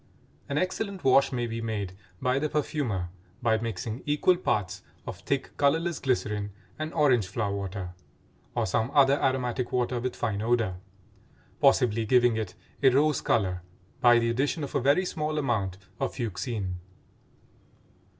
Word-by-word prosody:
An 140 - -1
excellent 190 +2 -2
wash 135 +1 +5
may 120 -2 -1
be 115 0 -4
made 105 -5 -3 0.3
by 125 +1 +1
the 150 +1 -1
perfumer 130 - -1 0.3
by 115 -3 +2
mixing 115 +1 -4
equal 150 +5 +3
parts 95 - -1 0.2
of - - -6
thick, 140 -1 -2
colorless 160 +4 +2
glycerin 105 -5 -1 0.3
and 155 +1 -3
orange 130 - +3
flower 100 0 -2
water 95 -2 -5 0.6
(or - - +1
some 110 +5 0
other 140 0 +5
aromatic 125 -1 0
water 125 0 0
with 125 +1 -3
fine 105 -2 -2
odor), 110 -5 +1 0.8
possibly 125 -5 +4
giving 120 +1 +4
it 110 -1 -3 0.3
a 135 - +7
rose 145 +2 +3
color 90 -5 +1 0.4
by 120 -1 +6
the 115 0 +2
addition 140 +6 0
of 140 - -5
a - - +1
very 140 +8 +3
small 155 -3 -2
amount 110 -10 0 0.2
of - - -2
fuchsine. 105 -4 -3
120 Hz, 150 wpm, -28 LUFS, 105-140 Hz, 0.8 s, a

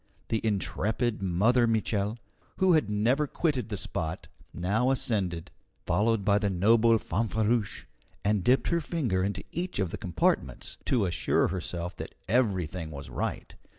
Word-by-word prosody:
The 110 - 0
intrepid 110 +2 0
Mother 110 +7 +3
Mitchel, 110 -1 0 0.4
who 190 -2 +4
had 155 -10 +3
never 120 +8 +2
quitted 130 -8 -1
the 105 - -3
spot, 80 -3 -4 0.2
now 105 +8 0
ascended, 95 -10 -1 0.3
followed 105 +3 +1
by 100 0 +4
the 105 -2 0
noble 115 +5 +4
Fanfreluche, 110 +2 -1 0.4
and 105 -2 +2
dipped 130 +6 +3
her 170 -1 +1
finger 125 - -1
into 100 +1 -2
each 175 +2 -3
of 95 -4 0
the - - -5
compartments, 90 -3 -1
to 120 -6 +2
assure 90 - +1
herself 90 -1 -4
that - - -7
everything 95 -8 0
was 70 -2 -8
right. - - -3
105 Hz, 145 wpm, -28 LUFS, 95-120 Hz, 0.4 s, who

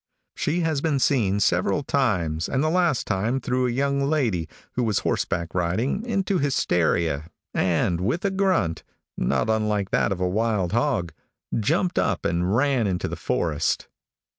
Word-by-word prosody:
She 175 +3 0
has 160 -4 0
been 155 -3 +1
seen 115 -7 +2
several 95 +6 +1
times, 90 - 0
and 135 +2 0
the 155 - +1
last 175 -6 +2
time 110 +6 0
threw 125 0 0
a - - 0
young 140 +3 0
lady, 115 - 0 0.2
who 125 - -1
was 110 -4 +1
horseback 85 -1 -1
riding, 95 - 0
into 195 -4 0
hysteria, 85 - +1 0.2
and 90 -1 +1
with 125 - -1
a 200 - +2
grunt 185 - +1 0.3
not - - 0
unlike 105 -3 0
that - - +2
of 95 - -2
a 90 - +1
wild 105 -2 0
hog 115 - 0 0.4
jumped 170 - +1
up - - 0
and 90 +4 +1
ran 130 -3 +2
into 90 -2 -1
the - - -4
forest. 75 -2 -1
110 Hz, 160 wpm, -24 LUFS, 90-140 Hz, 0.4 s, seen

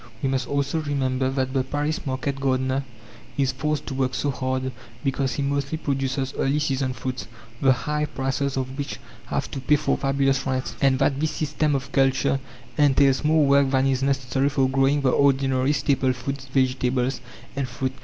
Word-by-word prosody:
We 135 - +2
must 130 -2 -1
also 140 +2 0
remember 130 -3 0
that 130 -1 -1
the 135 -2 +2
Paris 145 +3 -2
market 135 +1 -2
gardener 130 0 0 0.5
is 135 -2 +2
forced 150 +2 -2
to 140 - -5
work 130 -1 0
so 145 - 0
hard 130 0 -2 0.3
because 135 -1 0
he 140 - -2
mostly 140 +2 -1
produces 135 -2 -2
early 135 +2 +2
season 135 -3 0
fruits, 130 -1 -5 0.3
the 135 - +5
high 150 +4 0
prices 135 -1 -2
of 130 +1 -3
which 140 - -4 0.3
have - - -2
to - - -4
pay 135 +3 +3
for 145 0 0
fabulous 135 -1 +1
rents, 130 -4 -1
and 135 -1 +4
that 135 +1 +1
this 155 +1 +1
system 150 -1 0
of 140 +1 -4
culture 135 0 +2 0.4
entails 140 -1 +4
more 155 0 +4
work 140 0 +4
than 130 0 +2
is 135 -1 +1
necessary 135 0 +1
for 135 -2 +2
growing 135 +2 +2
the 130 -2 +3
ordinary 135 -1 +3
staple 135 -2 +1
food 135 +3 -5
vegetables 130 -1 +1 0.3
and 135 -1 -1
fruit. 130 +2 -3
135 Hz, 180 wpm, -24 LUFS, 130-140 Hz, 0.5 s, the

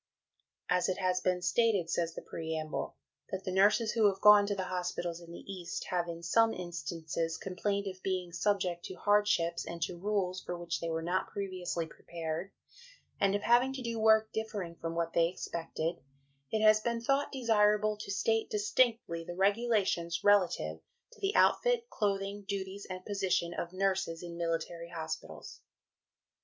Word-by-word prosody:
"As 180 +1 +2
it 185 - -1
has 185 -1 +1
been 180 -1 0
stated," 200 -1 +2
says 165 0 -1
the - - -7
preamble, 160 -1 -4 0.3
"that 190 0 -4
the 185 - -3
nurses 205 +4 +4
who 225 -3 +4
have 195 -1 0
gone 210 -1 +8
to 205 - 0
the 190 - -2
hospitals 175 -2 -3
in 170 0 -12
the 170 - -9
East, 185 -3 -5
have 175 -1 0
in 170 0 -6
some 225 +6 +3
instances 165 -2 -3
complained 200 +2 -2
of 190 -1 -6
being 185 -2 -2
subject 180 -1 0
to 185 - -7
hardships 205 -5 +2
and 170 - -6
to 175 - -4
rules 190 -2 -1
for 175 - -4
which 170 -1 -3
they 165 - -3
were 165 0 -2
not 180 +3 0
previously 185 -4 -3
prepared, 165 +2 -5 0.7
and 195 0 +3
of 205 - -2
having 245 +3 +4
to 265 -1 -5
do 230 -1 -3
work 220 0 +4
differing 210 -6 -3
from 165 0 -5
what 170 0 -1
they 165 0 +4
expected, 170 -1 -4 0.5
it 220 +5 0
has 215 0 +7
been 235 +1 -1
thought 275 +4 +1
desirable 215 -4 +3
to 210 -1 -9
state 225 +3 +1
distinctly 210 -5 +1
the 175 +1 -7
regulations 195 -4 +1
relative 175 - +3 0.3
to 480 - -18
the 395 +1 0
outfit, - - +3
clothing, 200 -1 -1
duties, 195 0 -4
and 185 0 -6
position 190 -4 0
of 170 0 -4
nurses 190 -3 -1
in 170 -1 -7
military 170 0 -3
hospitals." 160 -2 -6
185 Hz, 170 wpm, -32 LUFS, 170-210 Hz, 0.7 s, gone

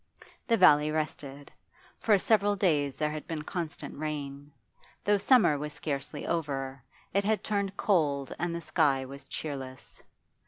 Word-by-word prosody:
The 230 -1 +3
valley 150 -5 +6
rested. 145 -2 -4 0.5
For 215 -3 +4
several 205 0 +3
days 150 -8 +1
there 150 -1 -1
had 155 0 -6
been 155 -2 -4
constant 165 -1 -5
rain; 145 -2 -5 0.5
though 205 0 +3
summer 205 - +4
was 150 +1 -5
scarcely 145 -1 -4
over, 135 -5 -2 0.3
it 200 +1 +2
had 215 +1 +1
turned 200 -2 -1
cold 145 -8 +1
and 175 0 -1
the 170 - -4
sky 145 -4 +2
was 140 +2 -10
cheerless. 135 -4 -6
155 Hz, 145 wpm, -29 LUFS, 140-190 Hz, 0.5 s, valley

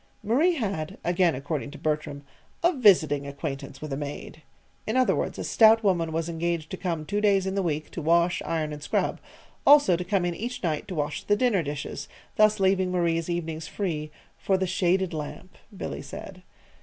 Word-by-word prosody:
Marie 300 - +3
had 195 - -3
again 175 -2 +2
according 145 +2 -4
to 150 - -10
Bertram 150 -2 -2 0.4
"a 345 +2 +4
visiting 155 - +4
acquaintance 140 -1 -6
with 150 -2 -5
a - - 0
maid." 145 +2 -7 0.5
In 220 +4 0
other 255 - +3
words, - - -2
a - - -4
stout 225 0 +5
woman 175 -5 +1
was 165 +1 -2
engaged 170 -1 -2
to 190 - -4
come 165 -5 -3
two 205 +5 -1
days 200 -2 +3
in 190 - -2
the 195 - 0
week 155 -4 -2
to 170 - -5
wash, 170 +2 +2
iron, 155 -2 -2
and 150 - -8
scrub; - - -1 0.4
also 285 -10 +6
to 180 - -3
come 185 -1 0
in 175 - -1
each 240 +6 -5
night 155 -4 -1
to 185 - -5
wash 150 -1 -2
the 205 - +2
dinner 215 -4 +2
dishes, 145 -2 -5 0.3
thus 215 0 +4
leaving 190 -1 +2
Marie's 170 -2 0
evenings 165 -2 -3
free 155 -6 -3 0.3
"for 190 - +1
the 190 - 0
shaded 185 0 +1
lamp," 155 +4 -7 0.2
Billy - - -5
said. 185 -1 -9
175 Hz, 195 wpm, -26 LUFS, 155-195 Hz, 0.5 s, also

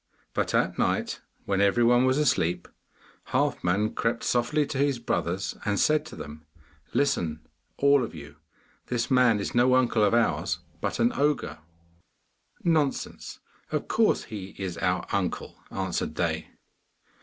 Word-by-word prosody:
But - - 0
at - - +1
night, - - 0 0.2
when 100 0 +1
every 100 +4 +3
one 120 +2 +5
was 130 +1 +3
asleep, 90 - +1 0.7
Halfman 100 +5 +1
crept 115 0 -1
softly 135 +5 +1
to 135 - -4
his 140 -2 +2
brothers, 95 -5 -2
and 100 -1 0
said 155 0 +2
to - - -10
them, 75 +1 -9 0.5
'Listen, 80 - 0 0.3
all 140 -1 +4
of 115 - -6
you! 75 -1 -11 0.5
This 120 0 -2
man 125 -4 +4
is 100 - -3
no 125 +1 +4
uncle 120 -4 +3
of 105 +3 +4
ours, 120 -1 +1 0.2
but - - -2
an 120 +1 +3
ogre.' 145 0 0 1.0
'Nonsense; 155 -5 -1 0.3
of - - -2
course - - +2
he 100 -3 -8
is 95 -3 -4
our 90 0 0
uncle,' - - -2
answered 95 -2 -2
they. - - -1
115 Hz, 145 wpm, -27 LUFS, 95-130 Hz, 1.0 s, one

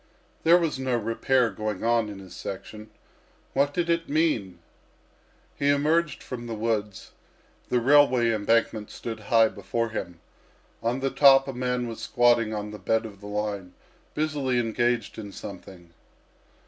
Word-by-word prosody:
There 170 +2 +6
was 160 -6 -1
no 130 -2 0
repair 115 +2 +1
going 110 -3 -4
on 115 -2 +2
in 100 - -8
his 95 -2 -12
section. 105 +3 -8 0.6
What 140 +1 +2
did 170 +3 -1
it 170 0 0
mean? 140 - 0 1.0
He 140 - 0
emerged 150 +3 +1
from 120 -2 -7
the 115 - -4
woods, 105 -2 -3 0.6
the 125 - +2
railway 130 -2 +4
embankment 110 0 +1
stood 115 -2 -6
high 110 +1 +3
before 115 +4 -3
him; 90 -6 -6 0.6
on 120 +3 -1
the 135 0 0
top 135 0 +6
a 135 - -4
man 125 0 -2
was 115 -1 -7
squatting 120 -2 +3
on 105 -1 -4
the 105 - -9
bed 115 +4 0
of 100 -3 -10
the 105 - -9
line 105 -3 -4 0.4
busily 145 -5 0
engaged 120 -1 0
in 100 -2 -7
something. 90 -3 -10
115 Hz, 150 wpm, -26 LUFS, 105-135 Hz, 1.0 s, There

